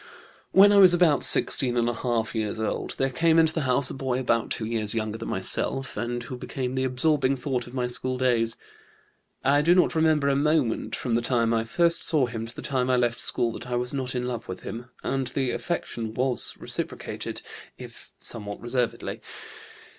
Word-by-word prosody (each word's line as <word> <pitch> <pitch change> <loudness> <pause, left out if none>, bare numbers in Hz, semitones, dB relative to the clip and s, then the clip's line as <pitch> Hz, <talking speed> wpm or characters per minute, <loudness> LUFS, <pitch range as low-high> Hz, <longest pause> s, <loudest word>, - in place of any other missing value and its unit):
"When 200 +1 +7
I 205 - +4
was 185 -3 +7
about 165 -5 +3
16½ 120 -2 +3
years 110 -1 -3
old 110 - -3
there 135 0 0
came 165 +5 +2
into 160 -1 +4
the 160 - -1
house 130 +1 +3
a - - -5
boy 130 -2 -2
about 115 -3 0
two 110 - -2
years 110 -1 0
younger 110 0 -3
than - - -6
myself, 135 0 0
and 120 0 -3
who 125 +2 -7
became 130 -1 -4
the 130 0 -1
absorbing 135 +1 +1
thought 125 -2 -3
of 120 - -11
my 125 -2 -1
school 130 +1 -1
days. 120 -3 +1 0.9
I 145 +2 +3
do 170 +4 +4
not 180 - +3
remember 160 -3 +2
a 140 - +2
moment, 145 -4 0
from 125 - -3
the 120 - +2
time 115 -1 +1
I 115 0 0
first 170 +7 +3
saw 150 -5 +1
him 115 -2 -6
to 120 - -10
the - - -8
time 130 -2 -1
I 130 - +3
left 120 -1 0
school, 115 - +1
that 120 - -9
I 125 - -1
was 125 +2 -2
not 130 -2 -3
in 125 0 -2
love 120 -2 -5
with 95 - -7
him, 120 +2 -8
and 135 -1 -1
the 130 -1 -1
affection 115 -10 -4
was 130 -1 0
reciprocated, - - -4 0.3
if - - -12
somewhat 105 -2 -7
reservedly. 120 0 -3
125 Hz, 195 wpm, -25 LUFS, 115-140 Hz, 0.9 s, When